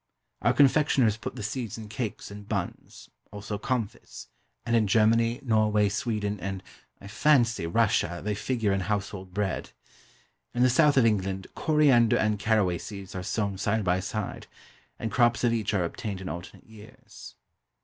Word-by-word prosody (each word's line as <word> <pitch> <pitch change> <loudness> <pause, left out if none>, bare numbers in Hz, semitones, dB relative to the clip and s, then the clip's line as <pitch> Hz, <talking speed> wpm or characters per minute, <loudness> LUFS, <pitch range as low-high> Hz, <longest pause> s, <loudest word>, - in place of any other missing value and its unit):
Our 120 +4 +3
confectioners 135 -5 +4
put 110 - -7
the - - -6
seeds 115 0 -4
in 110 -1 -8
cakes 110 -2 -5
and 100 +1 -10
buns, 100 -5 -5 0.2
also 105 0 -5
comfits, 115 -3 -4 0.4
and 120 0 +1
in 110 -2 +3
Germany, 115 +3 +3
Norway, 110 -3 +2
Sweden, 105 -1 -2
and 95 0 -5 0.4
(I - - -13
fancy) 115 - +2
Russia, 85 -3 +1
they 105 +1 -1
figure 110 -1 -1
in 95 - 0
household 95 -1 -3
bread. 100 0 -2 0.9
In 120 - +3
the 125 - +5
south 145 +2 +4
of 125 - +5
England, 95 -3 0
coriander 140 -7 +3
and 105 -1 +1
caraway 100 -6 +1
seeds 100 -3 -8
are 95 - -4
sown 100 0 -2
side 105 +2 0
by 90 0 +1
side, 100 +1 -5 0.5
and 110 - -4
crops 120 +2 +2
of 120 -1 +3
each 110 -2 -1
are 95 -4 +1
obtained 100 +3 -4
in 95 0 -6
alternate 85 +1 -8
years. 110 -1 -14
105 Hz, 160 wpm, -27 LUFS, 100-115 Hz, 0.9 s, the